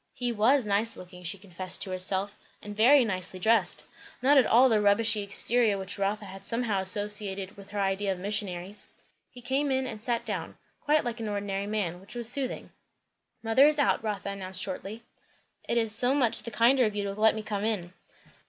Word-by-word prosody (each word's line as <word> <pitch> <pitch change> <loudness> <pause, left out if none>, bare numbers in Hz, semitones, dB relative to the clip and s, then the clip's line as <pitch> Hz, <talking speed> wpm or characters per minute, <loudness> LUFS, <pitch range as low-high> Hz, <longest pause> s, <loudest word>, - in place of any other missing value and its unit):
He 245 -1 -2
was 235 +4 +2
nice 210 +3 +1
looking, 180 0 -12
she 180 +3 -3
confessed 185 -1 -3
to 190 - -6
herself, 190 +2 -2 0.3
and 205 0 -8
very 250 +5 +5
nicely 185 -2 -3
dressed! 225 +4 +2 0.3
not 275 +4 +4
at 265 -4 +5
all 250 +4 +6
the 220 -4 +2
rubbishy 210 +1 +2
exterior 210 +2 +2
which 195 +1 -6
Rotha 195 -1 -3
somehow 220 -1 0
associated 200 0 +1
with 200 0 -13
her 205 - -5
idea 195 0 0
of 190 - -3
missionaries. 195 0 -3 0.4
He 245 -1 -14
came 270 +3 0
in 265 0 0
and 220 -4 -7
sat 235 -1 -1
down, 190 -7 -4 0.3
quite 300 +1 +2
like 235 0 -4
an 220 -2 -4
ordinary 200 -1 -3
man; 195 -5 -3
which 200 +5 -9
was 240 -2 0
soothing. 260 +1 -3 0.7
"Mother 230 +6 +5
is 305 0 +2
out," 285 -5 +1
Rotha 210 -2 -3
announced 190 -2 -6
shortly. 200 +4 -5 0.7
"It 235 - +1
is 225 -2 +2
so 245 +4 +3
much 250 -6 +1
the 235 - -7
kinder 240 +3 +3
of 210 -1 -2
you 205 - -2
to 200 0 -3
let 215 +2 +3
me 220 - -5
come 210 -1 -4
in." 195 -5 -2
210 Hz, 195 wpm, -28 LUFS, 195-235 Hz, 0.7 s, all